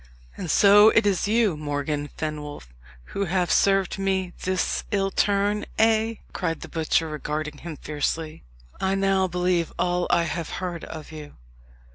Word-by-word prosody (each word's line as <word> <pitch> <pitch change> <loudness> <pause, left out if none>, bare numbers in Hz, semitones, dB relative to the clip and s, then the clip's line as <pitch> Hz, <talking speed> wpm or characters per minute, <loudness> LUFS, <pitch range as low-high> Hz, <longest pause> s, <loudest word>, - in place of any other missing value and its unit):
"And 175 - -6
so 205 +5 +7
it 225 -1 +3
is 200 -1 +1
you, 215 -4 +2
Morgan 145 0 -3
Fenwolf, 150 - -5 0.4
who 200 - -1
have 180 -1 0
served 195 -1 +2
me 190 -2 -1
this 185 0 -1
ill 195 -2 0
turn, 205 +1 +1
eh?" 225 0 +3 0.2
cried 165 -3 -2
the - - -8
butcher, 160 0 +1
regarding 150 -1 -4
him 165 -3 -7
fiercely. 155 +2 -3 0.4
"I 190 0 +1
now 195 -1 +2
believe 180 -1 0
all 175 0 0
I 170 - +3
have 170 -1 -3
heard 175 -3 -4
of 155 -1 -9
you." 150 -2 -10
180 Hz, 150 wpm, -25 LUFS, 155-195 Hz, 0.4 s, so